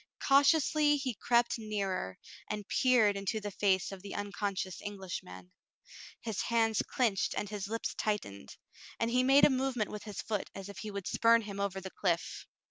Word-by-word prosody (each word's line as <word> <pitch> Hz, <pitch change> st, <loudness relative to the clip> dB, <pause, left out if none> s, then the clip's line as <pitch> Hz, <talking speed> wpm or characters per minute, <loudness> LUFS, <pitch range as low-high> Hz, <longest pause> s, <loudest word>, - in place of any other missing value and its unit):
Cautiously 295 Hz, +1 st, +4 dB
he 270 Hz, -3 st, -2 dB
crept 235 Hz, +2 st, +1 dB
nearer, 195 Hz, -, -3 dB, 0.3 s
and 210 Hz, -1 st, -4 dB
peered 240 Hz, -6 st, +4 dB
into 200 Hz, +2 st, -2 dB
the 205 Hz, -1 st, -5 dB
face 190 Hz, -1 st, +1 dB
of 195 Hz, -1 st, -8 dB
the 200 Hz, 0 st, -7 dB
uncon 205 Hz, 0 st, -3 dB
scious 185 Hz, -1 st, -4 dB
Englishman. 175 Hz, -, -7 dB, 0.7 s
His 225 Hz, -4 st, -3 dB
hands 225 Hz, -2 st, +2 dB
clinched 225 Hz, -7 st, 0 dB
and 210 Hz, -, -2 dB
his 205 Hz, -2 st, -4 dB
lips 225 Hz, +2 st, -3 dB
tightened, 100 Hz, -, -3 dB, 0.4 s
and 230 Hz, 0 st, 0 dB
he 250 Hz, +1 st, +3 dB
made 270 Hz, +2 st, +6 dB
a -, -, +4 dB
movement 255 Hz, -4 st, -1 dB
with 210 Hz, +1 st, -7 dB
his 210 Hz, -3 st, -7 dB
foot 210 Hz, -3 st, -3 dB
as 195 Hz, 0 st, -7 dB
if 200 Hz, -, -9 dB
he 215 Hz, -, -5 dB
would 200 Hz, -2 st, -5 dB
spurn 230 Hz, 0 st, +4 dB
him 200 Hz, -1 st, -7 dB
over 200 Hz, -1 st, -1 dB
the 190 Hz, 0 st, -8 dB
cliff. 170 Hz, -3 st, -2 dB
210 Hz, 180 wpm, -32 LUFS, 195-235 Hz, 0.7 s, made